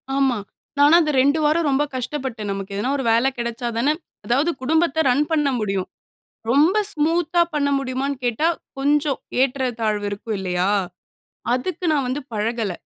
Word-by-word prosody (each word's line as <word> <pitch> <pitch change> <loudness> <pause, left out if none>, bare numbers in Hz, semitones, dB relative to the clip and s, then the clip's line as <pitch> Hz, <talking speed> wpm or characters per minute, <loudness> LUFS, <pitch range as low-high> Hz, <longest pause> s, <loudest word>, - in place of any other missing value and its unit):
ஆமா. 270 -3 +2 0.4
நானும் 295 +4 +7
அது 305 -2 0
2 285 +4 +3
வாரம் 310 +2 +2
ரொம்ப 275 +1 +2
கஷ்டப்பட்டேன். 250 -4 -4
நமக்கு 195 0 -5
எதுனா 205 +6 -1
ஒரு 270 - -2
வேல 230 +3 +3
கெடச்சாதான, 235 +2 -1 0.4
அதாவது 280 +8 +2
குடும்பத்த 320 +2 +2
ரன் 280 +4 +3
பண்ண 300 -3 +2
முடியும். 195 -3 -2 0.6
ரொம்ப 305 - +4 0.2
ஸ்மூத்தா 330 +2 +1
பண்ண 285 -1 +1
முடியுமான்னு 275 +1 -2
கேட்டா, 245 +7 +1 0.3
கொஞ்சம் 290 0 +1 0.2
ஏற்றத்தாழ்வு 235 -6 -1
இருக்கும் 205 +1 -4
இல்லயா? 185 0 0 0.8
அதுக்கு 335 +8 -3
நான் 280 -4 +1
வந்து 260 +3 -2
பழகல. 220 -1 -1
265 Hz, 140 wpm, -22 LUFS, 230-295 Hz, 0.8 s, நானும்